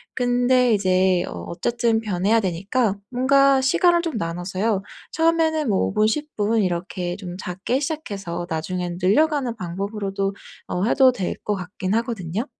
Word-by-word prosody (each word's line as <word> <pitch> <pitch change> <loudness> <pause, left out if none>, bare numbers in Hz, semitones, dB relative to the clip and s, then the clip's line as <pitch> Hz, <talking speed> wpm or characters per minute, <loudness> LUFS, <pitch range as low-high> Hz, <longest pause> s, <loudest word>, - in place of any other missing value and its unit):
근데 245 -1 +3
이제 185 -2 +2
어 - - -7 0.2
어쨌든 230 +4 0
변해야 210 +1 +1
되니까 195 +3 0 0.2
뭔가 270 +1 +4
시간을 345 +6 +3
좀 330 -8 -3
나눠서요 185 +4 -1 0.3
처음에는 320 -3 +2
뭐 195 - +2
5 95 - -3
분, 215 - +3
10 300 +6 -3
분 215 +1 +1
이렇게 175 0 -2
좀 180 -3 -7
작게 190 +8 -2
시작해서 200 - -4
나중에는 175 +2 -3
늘려가는 265 - +2
방법으로도 195 +1 -3 0.3
어 180 - -2
해도 260 +2 +5
될 190 -7 -3
것 210 - 0
같긴 185 +1 -4
하거든요. 225 -2 -2
210 Hz, 310 characters per minute, -22 LUFS, 185-255 Hz, 0.3 s, 해도